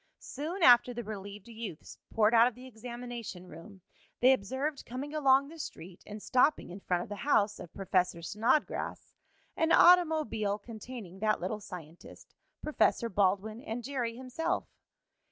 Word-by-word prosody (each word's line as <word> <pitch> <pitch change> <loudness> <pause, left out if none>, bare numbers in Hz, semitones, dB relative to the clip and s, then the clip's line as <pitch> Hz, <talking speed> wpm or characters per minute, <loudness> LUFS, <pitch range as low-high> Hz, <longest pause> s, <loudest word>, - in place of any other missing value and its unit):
Soon 335 +6 -5
after 245 -1 +6
the 240 - -4
relieved 205 -1 -8
youths 225 -8 -8
poured 220 0 +3
out 230 +1 +7
of 250 - -4
the 250 +1 -12
examination 235 -5 -8
room 185 +4 -12 0.4
they 255 +2 +6
observed, 265 +6 -3
coming 270 +5 -6
along 275 -2 +4
the 325 +1 -12
street 180 - -8
and 210 0 -8
stopping 255 - +2
in 185 - -8
front 180 -2 -1
of - - -12
the 205 - -5
house 210 -7 +1
of 170 - -9
Professor 185 -3 0
Snodgrass, 230 - -1 0.4
an 325 0 +1
automobile 315 - +4
containing 215 -3 -9
that 215 +1 +1
little 200 +4 -3
scientist, 170 -4 -11 0.3
Professor 275 -5 +1
Baldwin 200 +3 0
and 235 0 -5
Jerry 245 -4 -3
himself. 295 +8 -2
230 Hz, 150 wpm, -31 LUFS, 200-260 Hz, 0.4 s, out